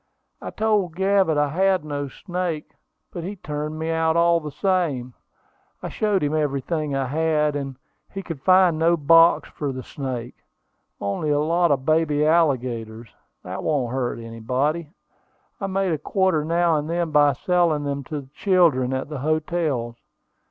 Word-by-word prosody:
"I - - -5
told 210 -6 0
Gavett 190 -4 +2
I 145 0 +2
had 185 +1 +1
no 145 -1 -3
snake; 175 +1 -4 0.4
but 170 - -6
he 195 +4 -5
turned 150 -3 -5
me 160 +1 -2
out, 160 0 +1
all 170 0 +4
the 155 -2 -6
same. 150 -9 -1 0.7
I - - -3
showed 205 -5 0
him 145 +1 0
everything 150 0 -1
I 135 -1 0
had; 150 +1 0
and 135 -2 -4 0.3
he 195 - -6
could 165 -7 -7
find 185 -2 +4
no 170 +1 +3
box 165 +3 +5
for 145 -2 -4
the 130 -1 -6
snake: 125 -4 -5 0.7
only 100 +10 -2
a 145 0 +2
lot 170 +3 +2
of 135 -2 0
baby 155 -1 +2
alligators, 125 -8 0 0.3
that - - -6
won't 130 -6 -1
hurt 130 -2 -2
anybody. 130 +8 -2 0.7
I 195 - -3
make 190 -2 0
a 155 - -2
quarter 190 -1 +1
now 170 0 +2
and 150 +1 -3
then 170 -1 -1
by 145 -1 +4
selling 170 0 +1
them 140 -1 -3
to 150 +1 -5
the 130 - -17
children 160 -11 +2
at 130 - -3
the 150 -2 -6
hotels. 155 -5 -1
155 Hz, 165 wpm, -23 LUFS, 140-170 Hz, 0.7 s, box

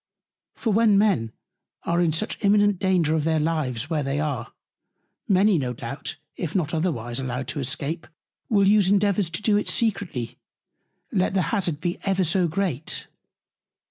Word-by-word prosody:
For 225 - -1
when 215 -1 +4
Men 195 - +2 0.5
are 170 +1 +1
in 170 -2 +3
such 190 +8 -3
imminent 205 -1 +4
Danger 185 -5 +2
of 160 -2 +1
their 160 0 +1
Lives, 150 -6 -1
where 160 -2 -1
they 135 +1 -1
are; 140 -6 -3 0.8
many, 195 -1 +4
no 125 -3 -2
doubt, 120 +4 -6 0.2
if 170 0 -4
not 170 -5 0
otherwise 135 -8 -1
allowed 130 -1 -3
to 135 - -3
escape, 140 +5 -3 0.4
will 200 -3 +4
use 205 -2 +4
Endeavours 200 -2 +2
to 165 +5 -5
do 210 -2 +3
it 210 - -1
secretly, 170 - -1 0.7
let 190 0 +1
the 185 - +1
Hazard 175 -8 0
be 175 0 -2
ever 195 -1 +1
so 180 +1 +2
great. 165 -4 -2
170 Hz, 160 wpm, -24 LUFS, 145-200 Hz, 0.8 s, when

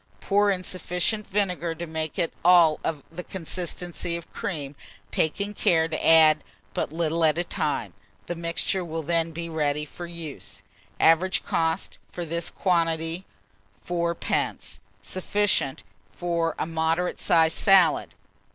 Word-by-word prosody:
Pour 205 +1 +2
in 185 -2 0
sufficient 185 +4 -1
vinegar 180 -4 -1
to 170 - -5
make 160 -1 -4
it 170 -3 0
of 165 -4 +4
the 175 +2 -6
consistency 175 -1 -4
of 170 - -12
cream, 145 -6 -4 0.4
taking 200 +6 0
care 160 -5 +3
to 160 -1 -4
add 160 -1 +6 0.3
but - - -2
little 165 0 0
at 155 0 +4
a 175 - +1
time. - - -2 0.3
The - - -3
mixture 170 +2 -1
will 165 -1 -4
then 165 +1 +1
be 170 +1 -5
ready 150 -2 -1
for 175 +3 -8
use. 170 -4 -8 0.4
Average 170 +4 +4
cost, 165 +2 -1
for 175 - -5
this 170 +1 -2
quantity, 165 0 0 0.6
7d. 170 -1 -1 0.2
Sufficient 185 - +1 0.3
for 170 +1 -1
a - - -1
moderate 165 +2 0
sized 160 -1 +3
salad. 190 -5 +4
170 Hz, 135 wpm, -26 LUFS, 160-180 Hz, 0.6 s, add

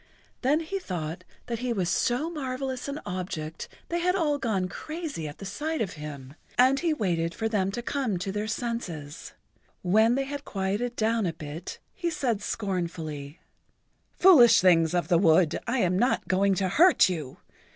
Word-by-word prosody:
Then 290 +5 +2
he 390 +5 -3
thought 175 - -5 0.2
that 235 -2 -4
he 250 0 -2
was 190 -6 0
so 245 - +1
marvelous 265 -3 -4
an 280 +2 -4
object 170 -3 -5 0.2
they 345 - 0
had 360 +2 +1
all 300 -6 +1
gone 205 -8 0
crazy 310 - -5
at 145 - -9
the 195 - -9
sight 310 +11 -3
of 205 -5 -2
him, 145 -3 -8 0.2
and 260 +2 +5
he 340 -2 +1
waited 170 - -1
for 225 - -1
them 200 -4 0
to 240 +4 -5
come 250 -8 -1
to 180 +2 -3
their 210 +2 -3
senses. 190 - -5 0.5
When 220 +6 +4
they 270 - 0
had 285 +1 -6
quieted 205 +4 -2
down 225 -2 +1
a 165 - -2
bit 155 +1 -7 0.2
he 345 -3 -2
said 245 -10 -1
scornfully: 170 -8 -4 0.8
"Foolish 300 - +8
things 170 -2 +4
of 175 -3 0
the 170 -2 +4
wood, 165 -2 +4
I 240 +3 0
am 180 0 +2
not 245 +4 +1
going 195 +1 +2
to 190 +1 0
hurt 340 - +6
you. 155 -8 -4
205 Hz, 175 wpm, -27 LUFS, 175-265 Hz, 0.8 s, Foolish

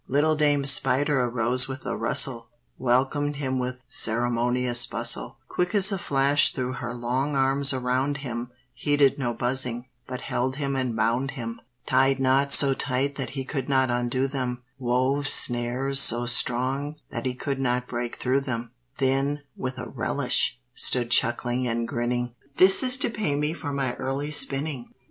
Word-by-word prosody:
Little 150 +3 +2
Dame 145 -2 +2
Spider 135 +1 +3
arose 120 +1 +2
with 135 0 -7
a - - -2
rustle, 115 -4 0 0.3
Welcomed 135 +4 +1
him 130 -2 -2
with 125 0 -4
ceremonious 120 +1 +2
bustle; 120 +1 -2
Quick 180 - -2
as 200 0 +6
a 195 - -2
flash 140 -1 +2
threw 130 -2 -3
her 120 -2 -5
long 130 +4 -2
arms 135 +1 +2
around 130 +2 -1
him, 120 -1 -5 0.2
Heeded 145 +1 +2
no 120 -3 -1
buzzing, 125 0 -1 0.2
but 125 -1 -6
held 130 +2 -2
him 140 -1 -2
and 130 -3 -2
bound 115 +5 0
him; 115 -1 -6 0.2
Tied 135 +1 +2
knots 135 +1 +4
so 140 -1 +3
tight 135 +1 -1
that 135 - -4
he 135 - -3
could 135 -1 -4
not 130 -2 +2
undo 120 +2 0
them; 125 -2 -4 0.2
Wove 130 +3 0
snares 125 +2 +2
so 120 -2 +3
strong 130 +5 +1 0.2
that 120 0 -4
he 125 - -3
could 135 +1 -4
not 125 -1 0
break 120 -1 -4
through 130 +2 0
them; 120 -3 -5 0.3
Then, 135 +2 0
with 130 0 -5
a - - -6
relish, - - 0
stood 120 -2 +1
chuckling 120 +2 +1
and 115 0 -2
grinning, 120 0 -2 0.2
"This 190 +1 +6
is 255 -1 +2
to 265 - -2
pay 210 -10 -1
me 150 +2 -1
for 145 -4 -6
my 135 -3 -2
early 140 +3 -3
spinning!" 140 -3 -1
130 Hz, 165 wpm, -25 LUFS, 120-140 Hz, 0.3 s, as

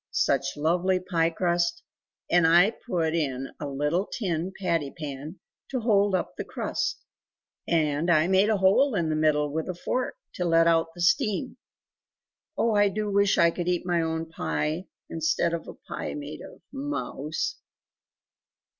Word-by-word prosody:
Such 135 0 0
lovely 180 +5 +1
pie 170 -3 +1
crust; 170 0 0 0.4
and 175 -2 +4
I 175 +6 +6
put 170 -10 -2
in 135 -5 -2
a 145 - -4
little 150 +7 -1
tin 180 -4 -2
patty 170 -6 0
pan 150 +3 -7 0.3
to 260 - -1
hold 205 -3 +3
up 180 - -2
the - - -4
crust; - - -3 0.7
and 155 0 +1
I 160 -1 +4
made 190 +3 +4
a 215 - +3
hole 200 +7 +4
in 170 -4 0
the 155 - 0
middle 150 -1 +2
with 160 +3 -2
a 185 - -3
fork 250 +8 -2 0.2
to 180 - -3
let 165 -1 +4
out 165 0 +2
the 175 - -7
steam 215 +5 +1 1.0
Oh 230 -1 +2
I 205 -1 +4
do 210 +1 -2
wish 200 0 +3
I 170 0 +5
could 175 0 -4
eat 180 0 0
my 175 -2 +1
own 160 0 -2
pie, 160 +1 -2 0.2
instead 165 +1 0
of 170 - -4
a - - -8
pie - - -6
made 290 -1 -7
of - - -12
mouse!" 270 - -3
170 Hz, 165 wpm, -26 LUFS, 160-190 Hz, 1.0 s, I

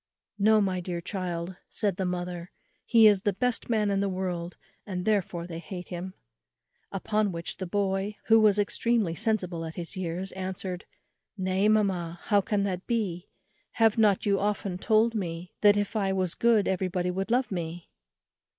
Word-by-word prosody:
"No, 215 +2 +5
my 190 -2 0
dear 175 -1 -4
child," 175 -1 -4
said 200 -4 -1
the 190 - -1
mother; 180 -1 -4 0.4
"he 230 -2 +6
is 205 -3 +6
the 205 -1 +1
best 250 +3 -1
man 215 -3 +2
in 195 - +1
the 200 0 +1
world, 180 -2 -3 0.3
and 185 -3 -4
therefore 190 -5 0
they 165 -2 -6
hate 180 +1 -8
him." 185 +1 -6 0.8
Upon 210 +1 0
which 170 -1 -5
the 185 0 -4
boy, 195 +2 -1
who 225 0 +6
was 210 -2 +5
extremely 210 -2 +1
sensible 185 -5 -1
at 160 0 -6
his 170 -2 -6
years, 185 +1 -3
answered, 185 -1 -5 0.5
"Nay, 190 +1 +1
mamma, 185 -6 +1
how 205 -2 +3
can 200 0 0
that 185 -2 -3
be? 200 -7 -2 0.4
have 225 -2 +4
not 210 -3 +4
you 200 -1 +2
often 200 -3 -1
told 220 +2 +3
me 175 -4 -4
that 205 -1 +6
if 205 +2 -1
I 195 -3 +1
was 185 -3 0
good 230 -3 +3
everybody 180 -1 0
would 195 +3 -3
love 245 +1 +1
me?" 170 -2 -5
190 Hz, 170 wpm, -28 LUFS, 180-210 Hz, 0.8 s, he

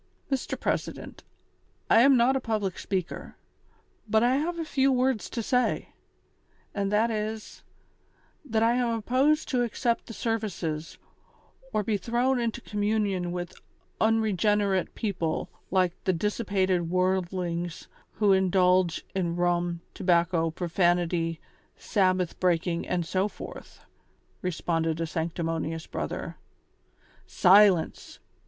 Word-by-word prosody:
"Mr, 270 -1 -2
President, - - -3 0.6
I 225 - +6
am 270 +1 +6
not 245 +3 +4
a - - +2
public 215 -6 -2
speaker, 185 -3 -4 0.7
but 220 +1 +3
I 250 +2 +3
have 340 +4 -2
a 330 - -3
few 275 -3 +2
words 255 -2 +1
to 230 - -3
say; 250 +2 0 0.8
and 200 -1 -1
that 220 +3 +2
is, 215 0 -4 0.8
that 225 -6 0
I 230 +1 +4
am 245 -1 +1
opposed 265 +7 +2
to 250 -3 +1
accept 235 0 -1
the 225 - -7
services, 180 -9 -3 0.7
or 215 -3 0
be 210 0 0
thrown 245 +5 +1
into 235 0 -2
communion 205 -4 -1
with 175 -1 -5 0.5
unregene 210 -2 +2
rate 190 -2 -1
people 175 -7 -2 0.2
like 185 -2 +2
the 185 - +3
dissipated 190 -2 0
worldlings 180 -2 -1 0.3
who 200 -1 +3
indulge 185 -2 +2
in 175 -3 -1
rum, 175 -1 0
tobacco, 170 -2 +2
profanity, 175 -1 0 0.4
Sabbath 185 -4 0
breaking 175 -1 0
and 175 -2 -1
so 185 +4 0
forth," - - -10 0.6
responded 165 -2 -1
a 165 - 0
sanctimonious 165 0 -3
brother. - - -5 0.9
"Silence!" 190 -2 +4
190 Hz, 120 wpm, -27 LUFS, 175-225 Hz, 0.9 s, I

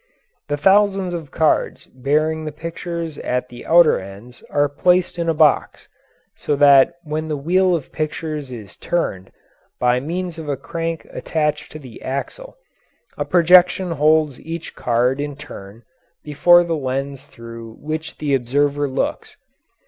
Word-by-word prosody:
The 145 0 -1
thousands 195 +2 +3
of 165 -4 -6
cards 155 +2 0
bearing 155 +4 -1
the 155 - -4
pictures 165 0 -6
at 125 0 -2
the 120 0 -11
outer 170 -1 +5
ends 100 +6 -12
are 145 0 +2
placed 180 +5 +1
in 165 -1 0
a - - +2
box, 150 -3 +2 0.5
so 150 - -1
that 140 +3 +6
when 155 0 -4
the 150 -2 -2
wheel 180 +5 +2
of 155 - -6
pictures 155 -2 -4
is 110 -5 -9
turned, 95 - -3 0.5
by 125 0 +2
means 170 +4 -4
of 155 -2 -7
a 140 - -1
crank 165 +3 -4
attached 150 -2 -2
to - - -7
the 130 -6 -12
axle, - - -6 0.6
a - - -3
projection 180 +1 +4
holds 155 -2 +2
each 165 +1 -7
card 125 +3 0
in 145 -1 -4
turn 115 -7 -11 0.4
before 175 +4 +5
the 170 -1 -2
lens 135 0 -4
through 115 -1 -10
which 155 +1 -5
the 145 -2 -1
observer 140 +3 +1
looks. 130 - -3
150 Hz, 150 wpm, -20 LUFS, 135-165 Hz, 0.6 s, that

